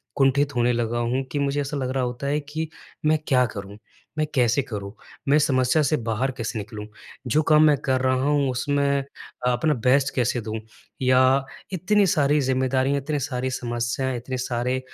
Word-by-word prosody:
कुंठित 140 +1 +2
होने 120 0 +3
लगा 120 0 -1
हूँ 120 +3 0
कि 145 - -1
मुझे 140 0 0
ऐसा 145 +1 -3
लग 130 -2 -2
रहा 130 -1 0
होता 125 +2 -3
है 145 +2 +1
कि 155 +2 -5 0.4
मैं 155 +1 +4
क्या 125 -2 +4
करूँ, 100 0 -7 0.4
मैं 155 - +2
कैसे 125 +1 +3
करूँ, 100 -4 -6 0.4
मैं 145 +2 +5
समस्या 130 +1 +2
से 155 +2 +2
बाहर 115 +2 -1
कैसे 115 -1 -3
निकलूँ, 105 0 -7 0.4
जो 150 +6 +3
काम 155 0 +5
मैं 150 - +5
कर 130 -2 +1
रहा 130 0 +2
हूँ, 145 -1 +2
उसमें 140 +3 0 0.6
अ, - - +4
अपना 135 +6 +1
बेस्ट 135 +2 +2
कैसे 120 -1 +1
दूँ 110 +1 -4 0.4
या 130 +1 +4 0.3
इतनी 200 +3 +2
सारी 150 -2 +3
ज़िम्मेदारियाँ, 130 +1 +1
इतने 150 +1 -2
सारी 130 -1 -2
समस्याएँ, 120 +1 -2
इतने 130 +2 -5
सारे 125 +1 -1
130 Hz, 180 wpm, -24 LUFS, 120-145 Hz, 0.6 s, मैं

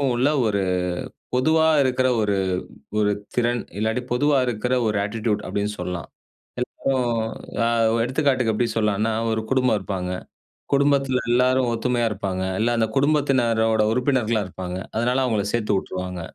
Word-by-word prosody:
உள்ள 130 +4 +2 0.2
ஒரு 100 -2 0 0.7
பொதுவா 160 +5 +3 0.2
இருக்கிற 130 -1 +2
ஒரு 100 -1 +1 0.6
ஒரு 105 -1 +3 0.3
திறன், 120 0 +1 0.2
இல்லாட்டி 110 +3 0
பொதுவா 145 +3 +3
இருக்குற 125 +1 -1
ஒரு 105 -1 0
அட்டிட்யூட். 105 0 -1
அப்டின்னு 105 +1 -2
சொல்லலாம். 90 -3 -4 0.7
இப்போ, 135 - 0 0.7
அ - - +3 0.4
எடுத்துக்காட்டுக்கு 130 -3 +1
எப்டி 120 +2 +1
சொல்லலான்னா, 105 0 +1 0.2
1 110 0 -1
குடும்பம் 130 -4 +3
இருப்பாங்க. 90 -1 -3 0.6
குடும்பத்தில 135 -3 +2
எல்லாரும் 125 0 +3
ஒத்துமையா 120 +1 0
இருப்பாங்க. 95 -3 -3 0.2
இல்ல 115 - +2
அந்த 110 -1 +2
குடும்பத்தினரோட 125 -7 +2
உறுப்பினர்களா 125 -4 +1
இருப்பாங்க. 90 0 -6 0.2
அதனால 125 +4 +1
அவுங்கள 110 -5 0
சேத்து 110 -3 0
உட்டுருவாங்க 90 -1 -5
115 Hz, 130 wpm, -23 LUFS, 105-130 Hz, 0.7 s, பொதுவா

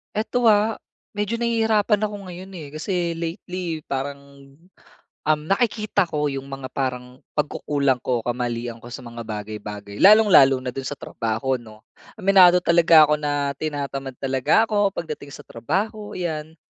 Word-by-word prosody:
Eto 240 +3 -1
ah, 215 0 +4 0.4
medyo 210 +3 -2
nahihirapan 220 -3 +2
ako 210 -1 -2
ngayon 185 +2 -9
eh. 165 -6 -8
Kasi 170 0 -2
lately, 170 0 -4
parang, 140 +1 -3 1.1
um, 155 0 +2
nakikita 210 0 +1
ko 150 -2 -1
yung 135 0 -6
mga 135 -1 -6
parang 125 -1 -4
pagkukulang 145 -2 0
ko, 125 -2 0
kamalian 120 -1 -3
ko - - -9
sa - - -6
mga 115 -1 -8
bagay-bagay, 105 -1 -7
lalong-lalo 190 -11 +7
na 130 - -8
do'n 135 - -4
sa 145 - -6
trabaho 115 +4 -2
'no. 110 -2 -14 0.4
Aminado 185 -3 +6
talaga 165 -3 +6
ako 150 - +3
na 145 -1 -1
tinatamad 140 -3 -4
talaga 135 - +2
ako 205 -2 +2
pagdating 150 -3 -6
sa - - -10
trabaho, 205 - -3
ayan. 160 -3 -4
150 Hz, 145 wpm, -23 LUFS, 130-195 Hz, 1.1 s, lalong-lalo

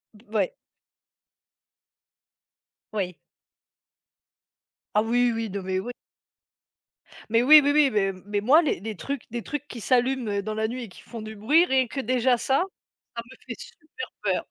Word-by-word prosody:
B 210 - -19
ouais. - - +1 2.4
Oui. 180 -5 -2 1.8
Ah, 210 - +5
oui, 240 +2 +2
oui, 225 -2 -3
non 200 0 -4
mais 185 0 -1
ouais. 245 +5 -5 1.4
Mais 230 +2 +3
oui, 305 +3 +10
oui, 285 +1 +2
oui, 295 -2 +5
mais 195 -2 +1
mais 205 0 -1
moi, 280 +9 +6
les 305 - -1
les 215 +1 -5
trucs 275 +5 -5
des 235 -1 -4
trucs 295 0 -5
qui 235 - -8
s'allument, 250 -2 +1
heu, 200 0 0
dans 215 +1 -4
la 220 +1 -1
nuit 250 +1 -5
et 225 - -9
qui - - -15
font 230 -2 -9
du 215 0 -8
bruit, 295 - +4
rien 260 -3 +2
que 270 - -5
déjà 255 0 +2
ça, 270 +8 +1 0.5
ça 235 - -3
me 260 - -13
fait 235 - -6
super 335 +8 -9 0.2
peur. - - 0
240 Hz, 170 wpm, -25 LUFS, 215-270 Hz, 2.4 s, oui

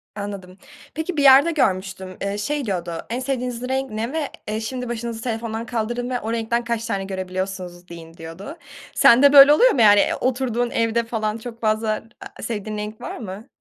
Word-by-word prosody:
Anladım. 200 -3 -7 0.4
Peki, 320 +1 -4
bir 285 - +2
yerde 275 +5 +7
görmüştüm. 190 - -1
Eee, 200 +1 -2
şey 285 +6 -2
diyordu, 180 -4 -3 0.2
en 240 +2 -2
sevdiğiniz 250 -2 -3
renk 265 -1 -1
ne 225 +5 -3
ve, 315 -3 -2 0.2
eee, 215 +1 -2
şimdi 250 +2 -5
başınızı 235 -1 -4
telefondan 225 -1 -4
kaldırın 240 +1 -3
ve 250 -1 -1
o 220 +2 -4
renkten 235 +1 -1
kaç 235 -1 -2
tane 195 -1 -2
görebiliyorsunuz 185 -1 -5
deyin, 165 -1 -11
diyordu. 165 - -9 0.4
Sende 280 +4 +6
böyle 280 +1 +10
oluyor - - +5
mu, 240 - +1
yani? 205 -1 +7
Eee, - - +2
o - - +2
oturduğun 245 -2 -1
evde 230 0 +1
falan 220 -1 -2
çok 235 0 -9
fazla 215 0 0 0.3
a - - -10
sevdiğin 215 -2 -4
renk 210 +1 -6
var - - -6
mı? 210 +1 -8
225 Hz, 190 wpm, -22 LUFS, 200-250 Hz, 0.4 s, böyle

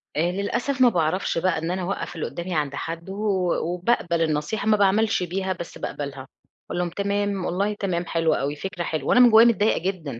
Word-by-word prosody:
آآ 170 +4 +1
للأسف 240 +7 -2
ما 245 - +7
باعرفش 170 -1 0
بقى 185 +2 +1
إن 165 +2 -2
أنا 185 0 -2
أوقّف 175 -1 -4
اللي 160 - -3
قُدامي 175 0 -5
عند 145 -2 -1
حدّه 165 +5 -5
و 195 -4 0 0.2
وباقبل 180 -3 0
النصيحة، 160 +7 -1
ما 215 -1 +4
باعملش 205 0 +2
بيها، 190 +2 -2
بس 170 -2 -8
باقبلها. 135 -2 -6 0.4
أقول 175 - -3
لهم 175 -1 0
تمام، 200 0 -1
والله 200 +4 0
تمام، 180 -4 -2
حلو 165 -1 +1
أوي، 145 +2 -1
فكرة 185 +2 -5
حلوة. 155 -2 -3
وأنا - - +5
من 245 -1 +8
جوايا 225 +2 +8
متضايقة 220 -2 +3
جدًا. 165 -9 -4
180 Hz, 200 wpm, -24 LUFS, 165-200 Hz, 0.4 s, من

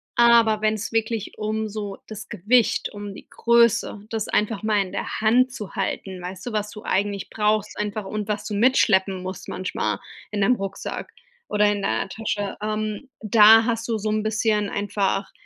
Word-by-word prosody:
Aber 235 -2 +5
wenn's 215 0 0
wirklich 225 -2 -2
um 215 +1 -1
so 205 -2 -5
das 215 -1 -8
Gewicht, 225 +6 +2
um 205 -1 -7
die - - -13
Größe, 235 -3 +2
das 220 -2 -2
einfach 210 -1 0
mal 215 -1 +2
in 185 - -10
der - - -4
Hand 245 +4 +4
zu 230 -6 -7
halten, 190 -2 -3
weißt 185 +1 -7
du, 245 - -4
was 210 -1 -1
du 210 +1 -10
eigentlich 200 0 -1
brauchst 210 -1 0
einfach 210 0 -3
und 210 +1 -4
was 210 0 -2
du 210 - -4
mitschleppen 200 -5 +3
musst 185 0 -6
manchmal 110 - -2 0.3
in 205 -1 -2
deinem 220 +6 +4
Rucksack 195 0 -5 0.4
oder 210 0 +3
in 205 -1 -2
deiner 110 - -1
Tasche, 205 -1 -3
ähm, 215 +3 -3
da 220 +1 +7
hast 230 -1 -1
du 230 -2 0
so 215 0 -2
'n 215 0 +1
bisschen 215 -1 0
einfach, 200 -1 -1
210 Hz, 180 wpm, -23 LUFS, 200-220 Hz, 0.4 s, da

